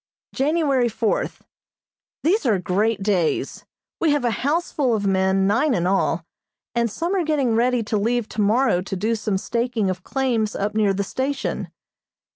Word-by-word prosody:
January 275 -4 +2
fourth: 220 0 -2 0.8
These 370 +6 +2
are 215 -4 +3
great 195 +3 0
days. 185 -6 0 0.3
We 330 - +2
have 290 -4 0
a 240 - +2
houseful 285 - 0
of 205 -2 -2
men, 190 0 +2
nine 240 +7 +2
in 175 - 0
all, 180 -3 +1 0.5
and 235 0 +1
some 335 - -2
are 380 -3 +1
getting 290 -7 +1
ready 240 +1 +2
to 215 0 -1
leave 230 +2 0
tomorrow 215 -1 +2
to 195 +1 -5
do 215 +5 0
some 215 -3 -1
staking 235 -1 -1
of 185 -1 -6
claims 245 -6 -1
up 205 +1 -2
near 210 -2 +2
the 200 - 0
station. 270 +7 -3
225 Hz, 160 wpm, -22 LUFS, 200-265 Hz, 0.8 s, are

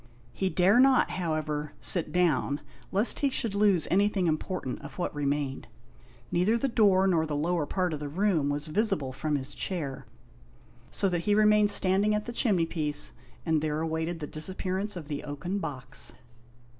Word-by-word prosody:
He 190 - -1
dare 190 +6 +4
not, 265 0 +4
however, 155 -4 -3
sit 165 -4 +3
down, 160 -4 +1 0.3
lest 205 +5 +3
he 280 - +2
should 230 -5 -1
lose 200 -5 +3
anything 200 0 +2
important 155 -3 -2
of 145 0 -11
what 175 - -2
remained. 145 -2 -2 0.6
Neither 185 +7 +2
the 275 - 0
door 200 -6 +3
nor 165 -4 +2
the 150 - -3
lower 160 +1 -1
part 180 -3 -1
of 150 - -4
the 145 -1 -5
room 170 -3 +1
was 145 +2 -2
visible 155 -6 0
from 150 +3 -2
his 140 0 -4
chair, 150 -8 -4 0.8
so 195 - 0
that 175 -2 -2
he 205 - +4
remained 210 -1 +4
standing 200 +2 +4
at 210 - -2
the 240 - -5
chimney 200 -9 +2
piece, 150 -3 -1 0.3
and 160 -2 +1
there 155 0 -1
awaited 160 +1 -2
the 150 - -4
disappearance 190 +6 -2
of 165 -5 -7
the 145 -2 -4
oaken 150 +7 -4
box. 130 -8 -4
175 Hz, 170 wpm, -28 LUFS, 150-200 Hz, 0.8 s, dare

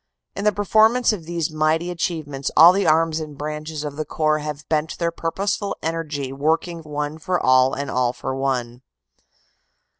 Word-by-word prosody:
"In 200 - -4
the 210 - +5
performance 220 +4 +3
of 175 -6 -6
these 170 -2 -2
mighty 155 +3 0
achievements 155 -6 -3
all 170 +3 +9
the 200 +1 +1
arms 160 0 +3
and 150 -2 -7
branches 150 +1 -5
of 145 -1 -6
the 155 - -1
Corps 155 0 0
have 150 -1 -6
bent 155 0 -1
their 170 -1 0
purposeful 195 +5 -2
energy 155 -5 -3
working 160 +4 0
one 150 0 -5
for 180 +2 -1
all 130 0 +4
and 140 +1 -4
all 125 -1 +1
for 130 - -5
one. 125 -3 -2
155 Hz, 170 wpm, -22 LUFS, 145-170 Hz, -, all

